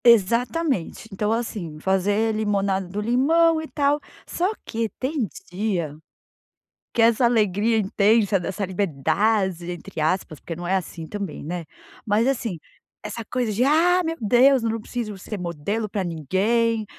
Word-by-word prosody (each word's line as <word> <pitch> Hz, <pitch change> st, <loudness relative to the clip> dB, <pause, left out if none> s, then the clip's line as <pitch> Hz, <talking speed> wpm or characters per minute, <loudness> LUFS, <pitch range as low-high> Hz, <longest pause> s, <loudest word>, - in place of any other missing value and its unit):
Exatamente. 235 Hz, -, +2 dB
Então 210 Hz, +2 st, -1 dB
assim, 210 Hz, -9 st, -3 dB
fazer 200 Hz, +5 st, +1 dB
limonada 200 Hz, -3 st, 0 dB
do 195 Hz, +4 st, -5 dB
limão 315 Hz, +9 st, +3 dB
e 315 Hz, -, -7 dB
tal. 290 Hz, 0 st, +1 dB, 0.3 s
Só 365 Hz, +4 st, 0 dB
que 225 Hz, 0 st, -2 dB
tem 265 Hz, -3 st, -1 dB, 0.2 s
dia 180 Hz, -6 st, -2 dB, 1.0 s
que -, -, 0 dB
essa 230 Hz, +2 st, +4 dB
alegria 220 Hz, -1 st, +3 dB
intensa, 205 Hz, 0 st, +3 dB
dessa 190 Hz, +2 st, -3 dB
"liberdade", 190 Hz, +1 st, 0 dB
entre 175 Hz, -2 st, -6 dB
aspas, 155 Hz, -1 st, 0 dB
porque 165 Hz, -, -6 dB
não 175 Hz, +1 st, -6 dB
é 190 Hz, -, +2 dB
assim 170 Hz, -3 st, -5 dB
também, 200 Hz, -3 st, -5 dB
né. 170 Hz, +3 st, -4 dB, 0.4 s
Mas 215 Hz, +3 st, +2 dB
assim, 235 Hz, -9 st, -1 dB, 0.4 s
essa 230 Hz, -, -5 dB
coisa 245 Hz, 0 st, -1 dB
de 230 Hz, +5 st, +2 dB
“Ah, 340 Hz, +6 st, +4 dB
meu 330 Hz, 0 st, -2 dB
Deus, 250 Hz, +4 st, +5 dB
eu 230 Hz, -, 0 dB
não 225 Hz, 0 st, -2 dB
preciso 215 Hz, -2 st, -5 dB
ser 200 Hz, +2 st, -6 dB
modelo 180 Hz, +6 st, -3 dB
pra 200 Hz, -1 st, -2 dB
ninguém, 210 Hz, -, +1 dB
210 Hz, 150 wpm, -23 LUFS, 185-235 Hz, 1.0 s, Deus